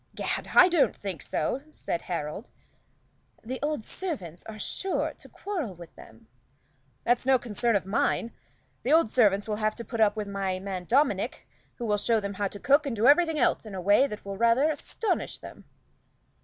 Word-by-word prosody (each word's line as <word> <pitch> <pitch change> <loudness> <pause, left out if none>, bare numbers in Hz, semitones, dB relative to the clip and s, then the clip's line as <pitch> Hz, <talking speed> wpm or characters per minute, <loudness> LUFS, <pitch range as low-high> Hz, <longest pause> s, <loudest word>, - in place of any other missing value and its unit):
"Gad! - - -2
I 365 - +9
don't 345 -5 +2
think 190 -8 -6
so," 250 - -2
said 170 - -4
Harold. 170 +4 -5 0.9
"The 255 +3 -5
old 295 -5 -1
servants 215 - -4
are 220 -1 -8
sure 380 - -2
to - - -14
quarrel 335 - -4
with 170 -1 -12
them." 110 0 -15 0.8
"That's 245 0 +2
no 265 0 +4
concern 235 -1 0
of 195 - 0
mine. 225 +3 0 0.5
The 275 - +1
old 320 -9 +4
servants 205 -4 +3
will 210 -1 -2
have 215 0 0
to 235 - -7
put 225 +2 -3
up 210 -1 +4
with 210 -1 -3
my 195 -2 -2
man 185 -1 -5
Dominic, 255 - +1 0.3
who 240 - -5
will 210 -2 +1
show 225 +2 +2
them 200 -1 -4
how 200 +1 -1
to 205 - -9
cook 285 +5 +3
and 255 - -2
do 220 +2 +1
everything 320 +3 +5
else 250 - +2
in 215 -3 -8
a - - -4
way 205 +9 +4
that 210 -6 -8
will 195 0 -5
rather 235 +7 +4
astonish 400 +8 -2
them." - - -12
220 Hz, 190 wpm, -27 LUFS, 200-270 Hz, 0.9 s, I